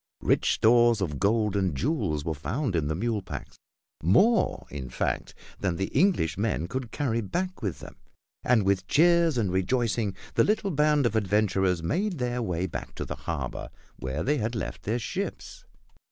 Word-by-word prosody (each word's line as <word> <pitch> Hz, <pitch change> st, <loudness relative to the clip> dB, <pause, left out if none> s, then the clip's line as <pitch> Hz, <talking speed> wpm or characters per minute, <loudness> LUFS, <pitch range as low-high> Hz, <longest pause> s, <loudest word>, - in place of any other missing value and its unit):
Rich -, -, +3 dB
stores 120 Hz, 0 st, +4 dB
of 75 Hz, -8 st, -2 dB
gold 105 Hz, 0 st, +2 dB
and 95 Hz, -7 st, 0 dB
jewels 100 Hz, -, -1 dB
were 80 Hz, -, -1 dB
found 110 Hz, -, -2 dB
in 80 Hz, -3 st, 0 dB
the 80 Hz, -, -1 dB
mule 110 Hz, +3 st, -1 dB
packs, -, -, -8 dB, 0.4 s
more, 200 Hz, -, +3 dB
in 65 Hz, -3 st, -6 dB
fact, -, -, -2 dB, 0.2 s
than 95 Hz, -3 st, 0 dB
the 95 Hz, +3 st, -2 dB
English 145 Hz, -, +2 dB
men 100 Hz, -7 st, 0 dB
could 130 Hz, +3 st, -4 dB
carry 115 Hz, -5 st, -1 dB
back 180 Hz, -, -3 dB
with 100 Hz, -6 st, -3 dB
them, -, -, -11 dB, 0.5 s
and 115 Hz, -5 st, +3 dB
with 95 Hz, -1 st, +1 dB
cheers 170 Hz, 0 st, +4 dB
and 105 Hz, -6 st, +1 dB
rejoicing, 105 Hz, +2 st, 0 dB, 0.2 s
the -, -, +4 dB
little 205 Hz, -2 st, +1 dB
band 150 Hz, -2 st, +3 dB
of 115 Hz, -2 st, +1 dB
adventurers 95 Hz, -4 st, +1 dB
made 180 Hz, -, -1 dB
their 125 Hz, -1 st, -1 dB
way 90 Hz, -5 st, -1 dB
back 90 Hz, -, -6 dB
to -, -, -4 dB
the -, -, -4 dB, 0.2 s
harbor -, -, -4 dB, 0.3 s
where 65 Hz, +4 st, -3 dB
they 145 Hz, +2 st, +1 dB
had 115 Hz, +2 st, -2 dB
left 110 Hz, -, -4 dB
their 110 Hz, +4 st, -1 dB
ships. 195 Hz, -, -5 dB
110 Hz, 175 wpm, -27 LUFS, 95-135 Hz, 0.5 s, stores